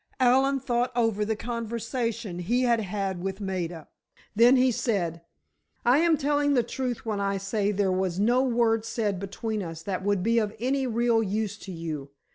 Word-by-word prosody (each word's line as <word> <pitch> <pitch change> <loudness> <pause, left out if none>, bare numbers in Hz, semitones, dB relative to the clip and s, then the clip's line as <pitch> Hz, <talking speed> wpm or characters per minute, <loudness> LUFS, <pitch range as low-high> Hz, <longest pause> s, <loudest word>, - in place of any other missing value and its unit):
Allen 265 +2 +4
thought 245 -1 0
over 225 -3 +1
the 220 +1 -1
conversation 230 -3 -3
he 235 +9 +1
had 235 -2 +3
had 195 -3 -3
with 190 +1 -4
Maida. 175 -5 -4 0.5
Then 240 +4 +6
he 255 0 +4
said: 175 -9 -1 0.6
"I 245 +4 +5
am 330 -1 +4
telling 290 0 +1
the 245 - +3
truth 245 0 -4
when 215 -2 -2
I 200 0 0
say 200 +1 -1
there 200 -1 +1
was 185 -1 -1
no 240 +5 +3
word 235 -3 +2
said 220 -4 -2
between 215 +2 -3
us 165 -3 -7
that 190 -2 -3
would 200 -2 +1
be 230 +2 +3
of 215 -1 -2
any 265 +3 0
real 235 -1 +2
use 210 0 -2
to 195 - -8
you. 160 -5 -5
220 Hz, 180 wpm, -27 LUFS, 195-245 Hz, 0.6 s, Then